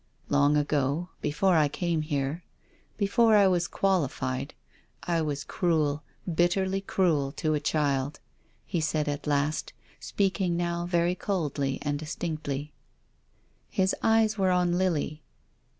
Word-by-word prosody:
" - - -41
Long 145 +1 +4
ago 145 +3 0
— - - -38
before 175 +5 +2
I 155 -2 +4
came 170 +2 -1
here, 150 +2 -2 0.5
before 220 +2 +4
I 205 -1 +6
was 175 -2 +1
qualified, 140 -8 -1 0.5
I 170 -2 0
was 145 -2 -2
cruel, 155 -4 0 0.3
bitterly 190 +3 +1
cruel 165 -8 +1
to 155 -1 -1
a 150 - +1
child," 145 -1 0 0.5
he 170 - -2
said 155 -1 0
at 145 0 -3
last, 145 +1 0 0.3
speaking 190 -3 0
now 170 0 -1
very 175 0 +2
coldly 150 -8 -2
and 145 -1 -1
distinctly. 150 -2 -4 1.0
His 190 0 +1
eyes 220 -1 +3
were 190 -1 +3
on 180 -1 +2
Lily. 155 -4 -1
160 Hz, 135 wpm, -28 LUFS, 145-180 Hz, 1.0 s, I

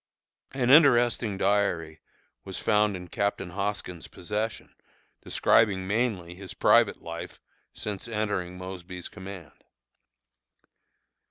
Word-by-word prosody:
An 130 -2 +1
interesting 120 -8 +5
diary 95 -6 0 0.4
was 95 - -6
found 105 -2 +2
in 90 -1 -8
Captain 100 -1 -2
Hoskins' 95 -3 -4
possession, 105 +5 -4 0.5
describing 95 -4 +3
mainly 100 -4 -1
his 95 0 -10
private - - +4
life 85 0 -7 0.3
since 105 +1 -5
entering 100 -5 -2
Mosby's 90 -1 -7
command. 95 -5 -10
100 Hz, 95 wpm, -27 LUFS, 90-105 Hz, 0.5 s, interesting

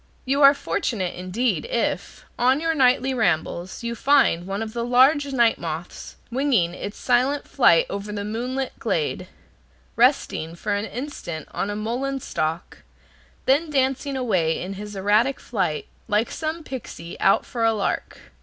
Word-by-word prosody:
You 275 +2 +1
are 280 0 +8
fortunate 190 -9 -2
indeed, 190 +5 -1
if, - - -2
on 255 +3 +4
your 325 +1 0
nightly 260 -2 +3
rambles, 180 -2 -1
you 235 0 -2
find 235 -9 +3
one 195 +3 -2
of 220 -1 -7
the 235 -1 -2
large 265 +5 +4
night 235 -4 +3
moths 165 0 -6 0.2
winging 240 -10 +2
its 200 +3 -6
silent 255 +3 +1
flight 170 -11 +4
over 200 +1 -5
the 205 -1 -4
moonlit 250 +5 -3
glade, 455 -2 -1 0.7
resting 230 - +2
for 205 +4 -2
an 205 +1 -1
instant 225 - -6
on 200 - -2
a 205 - -3
mullein 250 +6 -2
stalk, 160 -7 -3 0.7
then 290 +5 +3
dancing 270 0 0
away 185 -11 +1
in 185 +2 -5
his 205 +1 -8
erratic 210 +7 +2
flight, 180 -10 -2 0.2
like 215 +1 +1
some 315 +1 -4
pixy 220 - -7
out 195 - +3
for 235 -2 -3
a 225 - +5
lark. 205 -2 -3
235 Hz, 155 wpm, -23 LUFS, 195-270 Hz, 0.7 s, are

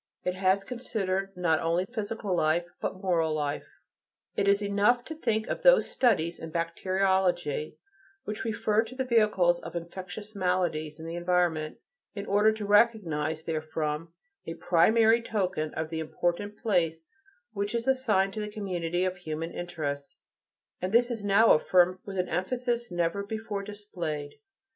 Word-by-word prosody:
It 180 - 0
has 190 +1 +2
considered 195 -5 -2
not 165 -3 +2
only 170 +3 +1
physical 215 -3 -3
life, 165 +1 +2 0.2
but 190 - -4
moral 165 -4 +1
life. 145 -1 -2 0.7
It 200 - +1
is 200 +1 +4
enough 205 +5 +2
to 320 - -6
think 220 -7 0
of - - -3
those - - +5
studies 175 -9 +2
in 165 - -7
bacteriology 175 -2 0 0.5
which 215 - -4
refer 220 -1 +1
to 240 +3 -10
the 260 - -1
vehicles 210 -8 +3
of - - -9
infectious 185 +5 -7
maladies 175 -5 -1
in 160 - -8
the 165 - -5
environment, 175 -3 0 0.4
in 200 -1 -4
order 210 +2 +4
to 220 -1 -5
recognize 175 -8 +2
therefrom 155 0 -3 0.4
a 165 - -4
primary 220 +7 +4
token 185 -9 -1
of 160 0 -3
the 160 - -2
important 175 +6 -2
place 165 -7 0 0.5
which 205 +2 -2
is 235 +2 -2
assigned 215 -8 +2
to 215 - -4
the 210 - -4
community 180 -4 -2
of 185 0 -2
human 165 -1 -5
interests, 145 -6 -5 0.6
and 185 +1 -2
this 240 +1 +4
is 225 -3 -4
now 205 +3 +5
affirmed 180 +3 +4
with 195 -1 -6
an 180 0 0
emphasis 240 +6 -1
never 175 +2 0
before 215 0 -4
displayed. 180 -8 -6
185 Hz, 155 wpm, -28 LUFS, 165-210 Hz, 0.7 s, those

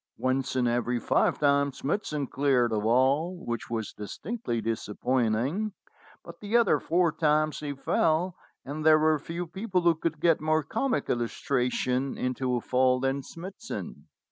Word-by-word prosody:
Once 130 0 -1
in 125 -2 +2
every 120 +1 0
five - - +2
times 140 -1 +2
Smithson 150 -2 -2
cleared 130 -3 +1
the 110 - +1
wall, 135 - +2
which 120 -1 -4
was 110 -3 -3
distinctly 120 - -4
disappointing, 120 - -1 0.5
but - - -11
the 210 +3 +1
other 235 -4 +3
four 170 -1 +2
times 155 0 +1
he 145 -1 -4
fell, 160 +6 +1 0.3
and 150 +3 -5
there 155 0 +7
were 155 0 +3
few 170 +4 -5
people 190 +2 -2
who 170 -1 +4
could 160 -1 -3
get 165 -2 +3
more 155 0 +2
comic 155 - -1
illustration 125 +2 -1
into 125 0 -1
a 120 - -1
fall 130 +1 +2
than 135 +1 0
Smithson. 190 - -8
140 Hz, 150 wpm, -28 LUFS, 125-165 Hz, 0.5 s, there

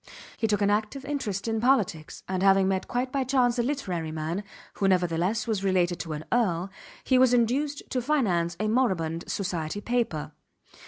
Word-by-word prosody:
He 225 - 0
took 210 -1 +1
an 200 - +3
active 215 +6 -1
interest 235 -9 -3
in 225 -1 0
politics; 215 - +1
and 185 -1 -2
having 195 0 +5
met 190 0 -1
quite 255 +1 -2
by 275 -1 0
chance 250 -2 +2
a - - +5
literary 190 - -2
man 160 +5 -3 0.3
who 195 - 0
nevertheless 180 +3 +1
was 215 -4 -1
related 180 -2 +1
to 165 -2 -4
an 150 +1 -6
earl 190 -6 +1 0.3
he 260 -1 +3
was 255 -1 +5
induced 275 +5 0
to 255 - 0
finance 185 - +1
a 215 - 0
moribund 185 -9 0
society 180 -2 -3
paper. 215 -10 -1
205 Hz, 175 wpm, -27 LUFS, 175-245 Hz, 0.3 s, having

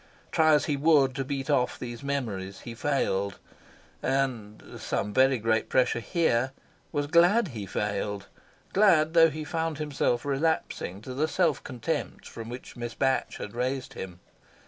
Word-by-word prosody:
Try 155 -1 +5
as 150 - +2
he 150 - 0
would 140 -3 +4
to 135 +1 -2
beat 135 0 -4
off 140 -4 +1
these 120 -2 -7
memories, 110 -9 -3
he 120 - -7
failed, 100 -7 -1 0.6
and 130 -6 -2
some 105 +1 -2
very 130 +1 +4
great 110 0 0
pressure 125 -2 +2
here! 130 -3 +1 0.4
was 145 -1 0
glad 175 +7 +4
he 105 -6 -6
failed; 100 0 -2 0.5
glad 170 -6 +4
though 165 -1 +7
he 155 +1 -5
found 160 0 -2
himself 145 -4 0
relapsing 140 - -1
to 130 - -6
the 150 +5 +1
self 160 0 +1
contempt 140 +4 -4
from 115 0 -8
which 125 +1 -8
Miss 120 -2 -5
Batch 135 -1 0
had 105 - -7
raised 125 +2 -2
him. 90 -2 -7
135 Hz, 155 wpm, -28 LUFS, 115-155 Hz, 0.6 s, though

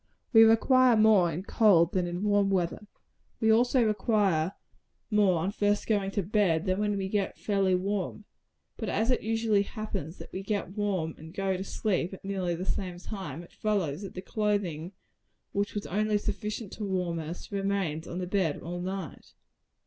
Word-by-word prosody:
We 225 - +9
require 240 +2 +5
more 210 -6 +5
in 170 +4 -4
cold 190 -6 +4
than 180 -2 +1
in 175 +2 -4
warm 205 -1 +3
weather. 190 +2 -1 0.5
We 220 -1 +4
also 245 +2 +4
require 205 -6 +1 0.6
more 205 -4 +4
on 190 +4 -1
first 205 0 +1
going 205 -3 +1
to 200 - +2
bed, 180 -4 +1
than 185 0 0
when 210 -1 0
we 190 -1 -2
get 200 0 -1
fairly 195 -3 +1
warm 195 +2 -2 0.5
but - - -3
as 225 +4 +1
it 250 - +1
usually 225 -1 +1
happens 200 -6 -5
that - - -11
we 190 - -3
get 200 -2 -2
warm 190 -7 -1
and 160 +1 -11
go 195 -1 0
to 185 - -3
sleep 190 -2 -1
at 190 - -16
nearly 185 -3 -1
the 180 +3 -5
same 180 -2 -3
time, 175 -5 -6
it - - -17
follows, 190 -7 -1
that 195 - -8
the 185 - -6
clothing 200 -6 -1 0.6
which 200 +1 -2
was 205 - -3
only 210 +2 +1
sufficient 210 +1 -4
to 215 - -6
warm 180 -4 -1
us, 165 +5 -7
remains 195 -6 -1
on 175 - -5
the 180 - -2
bed 180 -5 0
all 175 +2 -5
night. 190 -3 -6
195 Hz, 180 wpm, -29 LUFS, 180-210 Hz, 0.6 s, We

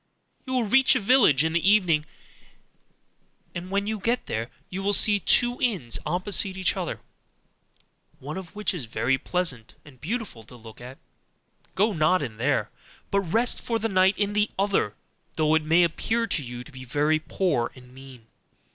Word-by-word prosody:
You 260 - -4
will 250 -2 +1
reach 265 +5 +4
a - - +2
village 200 - +4
in 160 0 -1
the 170 - +1
evening; 170 -8 +3 1.5
and 180 +1 -6
when 200 +1 -1
you 215 0 -3
get 235 +5 -1
there, 115 +2 -4 0.2
you 190 +1 -6
will 200 +1 +3
see 205 0 +5
two 240 +7 +2
inns 190 - -1
opposite 185 +3 0
to - - -7
each 185 - +1
other, - - -4 1.2
one 150 +2 -7
of 190 -2 -9
which 210 -1 -1
is 160 -9 -5
very 130 +3 0
pleasant 155 -12 -3
and 130 -4 -17
beautiful 205 - -5
to 125 - -14
look 115 -1 -13
at: 125 +2 -10 0.8
go 210 +3 +2
not 155 0 +2
in 110 -5 -6
there, 135 +4 0 0.4
but 200 - +2
rest 225 +7 +1
for 230 - -1
the 225 +1 -2
night 190 0 +3
in 205 0 -1
the 210 0 +1
other, 195 - 0 0.4
though 155 -1 +2
it 160 - +3
may 165 +3 +4
appear 225 +7 0
to 195 -8 -1
you 120 -2 -7
to 150 - -15
be 130 -1 -10
very 150 +5 +1
poor 155 -6 -1
and 125 -1 -16
mean. 130 -3 -14
175 Hz, 180 wpm, -25 LUFS, 135-205 Hz, 1.5 s, see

